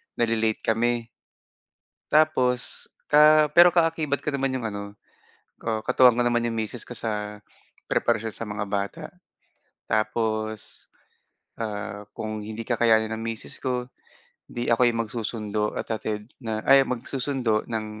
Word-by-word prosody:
nale-late 115 -2 0
kami. 120 +1 +1 1.1
Tapos, 130 -5 +2 0.2
ah 150 0 +7
pero, 175 0 +9
ah, 170 -1 +4
ka-akibat 155 -3 -2
ko 150 - -2
naman 135 -1 0
'yong 130 -3 -2
ano 100 -1 -5 0.8
ah, 110 -1 -1
katuwang 125 +2 +5
ko 120 - +1
naman 120 -1 +1
'yong 115 - -2
misis 110 +2 -3
ko 120 - -8
sa 105 -2 -3 0.5
preparasyon 110 +1 +1
sa 115 - -6
mga 105 0 -4
bata. 100 -1 -3 0.8
Tapos, 110 0 -1 0.7
ah, 105 -1 -5
kung 110 -1 -4
hindi 110 +2 -6
kakayanin 110 -2 +2
ng 110 - -4
misis 115 -1 -4
ko, 125 -1 -3 0.5
'di 120 0 -4
ako'y 120 0 +4
mag-susundo 110 -2 -2
at - - -5
hatid, 110 -1 -3
na 110 -4 -4
ay 135 0 +7
mag-susundo 125 -2 -1
ng 110 -2 -3
115 Hz, 135 wpm, -25 LUFS, 110-125 Hz, 1.1 s, pero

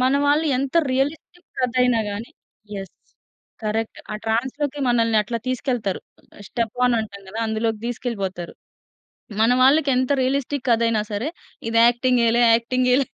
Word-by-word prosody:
మన 255 +2 +3
వాళ్ళు 295 +3 +3
ఎంత 270 +3 -3 0.2
రియలిస్టిక్ 295 +6 -2
కథ 255 -1 +1
అయినా 245 -2 +3
గాని 215 +3 -6 0.4
యెస్! 195 -2 -6 0.7
కరెక్ట్. 220 +1 -2
ఆ - - -3
ట్రాన్స్‌లోకి 265 +6 -1
మనల్ని 230 -2 +2
అట్లా 230 +3 -4
తీసుకెళ్తారు. 245 -6 -1 0.4
ఆహ్, - - -12
స్టెప్ 230 -2 -3
ఆన్ 245 - +2
అంటాం 200 -2 -8
కదా! 215 +4 -7
అందులోకి 220 0 -1
తీసుకెళ్ళిపోతారు. 200 -8 -4 0.9
మన 225 +2 +4
వాళ్ళకి 280 +2 +5
ఎంత 255 +1 +1
రియలిస్టిక్ 270 +1 -1
కథ 230 -1 +3
అయినా 220 -2 +1
సరే! 220 +9 -2 0.4
ఇది 230 0 +3
యాక్టింగేలే, 240 -1 +2
యాక్టింగేలే, 250 +3 +2
240 Hz, 140 wpm, -22 LUFS, 225-260 Hz, 0.9 s, వాళ్ళకి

